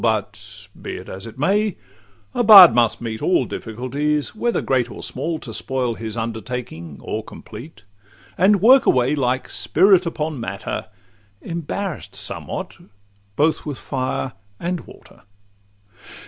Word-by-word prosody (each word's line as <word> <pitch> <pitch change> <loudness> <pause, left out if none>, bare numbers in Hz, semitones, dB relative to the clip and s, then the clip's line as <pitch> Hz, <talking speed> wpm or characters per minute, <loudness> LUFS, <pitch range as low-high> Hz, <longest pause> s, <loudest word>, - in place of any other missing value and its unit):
But 105 -2 -2
be - - -5
it - - -9
as 95 +4 -8
it 115 - -11
may, 200 +7 +1 0.6
a - - +1
bard 200 - +11
must 120 -1 +2
meet 110 -1 -5
All 175 -8 +2
difficulties, 140 +8 -2
whether 235 +2 0
great 125 -3 0
or - - -9
small, 160 +5 -3
To 115 -7 -9
spoil 125 0 -1
his 110 0 -6
undertaking 110 - -5
or 110 - -4
complete, 115 +3 -11 0.5
And 195 +1 +3
work 255 +3 +7
away 125 +2 +3
like 130 -3 0
spirit 190 -3 +3
upon 155 -3 -3
matter, 100 -1 -5 0.6
Embarrass'd 170 +1 -5
somewhat - - -4 0.6
both 155 +5 +1
with 145 -4 -5
fire 130 -1 -3 0.3
and 175 +1 -2
water. - - -16
130 Hz, 135 wpm, -21 LUFS, 115-170 Hz, 0.6 s, bard